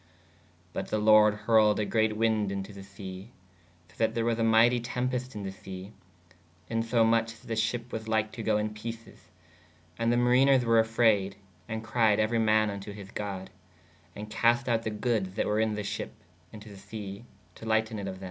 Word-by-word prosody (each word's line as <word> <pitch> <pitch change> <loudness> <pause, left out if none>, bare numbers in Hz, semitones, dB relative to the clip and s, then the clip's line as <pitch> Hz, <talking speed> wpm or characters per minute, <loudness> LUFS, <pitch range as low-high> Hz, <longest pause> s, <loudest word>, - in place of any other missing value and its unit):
¶ - - -31 0.7
But - - -4
[the] 110 - -1
lorde 105 0 +6
hurled 105 0 +3
a 105 - 0
greate 110 0 +1
winde 110 -3 +1
in 100 -1 -3
to 100 +2 -11
[the] 100 - -10
se/ 95 0 -9 0.6
so 90 - -23
that 110 0 +1
there 115 -1 0
was 115 -1 0
a - - +1
myghtie 115 +2 +4
tēpest 125 +1 -3
in 105 - -5
the 95 - -4
se: 95 0 -9 0.8
in 115 0 +1
so 115 0 +2
moch 115 0 +3
[that] 115 +2 -12
the 115 - -2
shepp 115 +2 -1
was 110 0 -5
lyke 110 -1 0
to 115 - -7
goo 110 -1 +1
in 105 0 -2
peces. 115 +1 -9 0.7
And 115 0 +2
the 120 - +2
mariners 125 +1 +4
were 115 -1 +5
afrayed 110 -4 +2 0.3
& 110 +4 -5
cried 110 -2 +2
euery 110 +1 +1
man 110 -1 +3
vn 100 -1 -5
to 100 +1 -8
his 100 -1 -10
god/ 95 -2 -5 0.4
& 90 +5 -12
cast 120 +2 +2
out 115 -2 +1
[the] 110 - -3
goodes 105 -3 -1
[that] - - 0
were 105 +1 0
in 110 -1 +1
[the] 105 - -3
sheppe 100 - -5 0.4
in 110 - -10
to 105 - -12
[the] - - -12
se/ 100 0 -8 0.3
to 110 - -12
lighten 110 0 0
it 100 - -5
of 95 - -4
thē. - - -13
110 Hz, 215 wpm, -28 LUFS, 105-115 Hz, 0.8 s, lorde